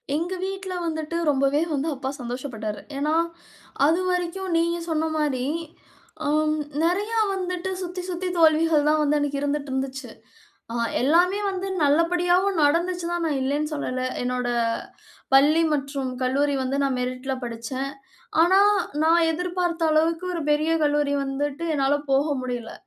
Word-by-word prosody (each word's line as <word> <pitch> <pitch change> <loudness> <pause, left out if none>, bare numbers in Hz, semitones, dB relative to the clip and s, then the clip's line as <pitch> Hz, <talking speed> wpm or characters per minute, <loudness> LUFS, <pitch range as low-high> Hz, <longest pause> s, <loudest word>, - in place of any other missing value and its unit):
எங்க 345 +4 -2
வீட்ல 385 -1 -5
வந்துட்டு 315 0 -3
ரொம்பவே 275 +2 +2
வந்து, 285 +3 -1
அப்பா 265 0 -4
சந்தோஷ 245 +1 -5
பட்டாரு. 215 -1 -4 0.2
ஏனா, 300 +3 +1 0.7
அதுவரைக்கும் 360 +2 0
நீங்க 340 +1 +1
சொன்ன 320 0 0
மாரி, 270 -4 0 0.8
ஆ - - -1 0.6
நிறைய 410 +7 +1 0.2
வந்துட்டு 365 0 -3
சுத்தி 360 0 -4
சுத்தி 365 +1 -3
தோல்விகள் 315 -2 +4
தான் 310 0 +3
வந்து 300 0 +2
அன்னைக்கு 285 -1 -1
இருந்துட்டு 285 -1 -2
இருந்துச்சு. 265 -1 -3 0.6
அ, - - -5 0.3
எல்லாமே 350 +9 +3
வந்து 380 0 -3 0.2
நல்லபடியாவும் 350 +5 +2
நடந்துச்சுதான், 345 +2 +1
நான் 295 -4 0
இல்லனு 295 +3 -1
சொல்லலை. 255 -3 -2 0.2
என்னோட 250 0 -1 0.8
பள்ளி 295 +5 +6
மற்றும் 275 -2 -2
கல்லூரி 280 +2 +1
வந்து, 260 +1 -1
நான் 270 -2 0
மெரிட்ல 255 +2 -3
படிச்சேன். 240 +4 -4 0.5
ஆனா, 375 +3 +5 0.4
நான் 330 +1 +4
எதிர்பார்த்த 350 -1 -1
அளவுக்கு 325 +3 +2
ஒரு 335 - -2
பெரிய 310 +2 +2
கல்லூரி 290 -1 +2
வந்துட்டு, 280 +3 -3
என்னால 275 0 +2 0.2
போக 275 +3 +3
முடியல. 245 -2 -4
305 Hz, 135 wpm, -24 LUFS, 275-345 Hz, 0.8 s, பள்ளி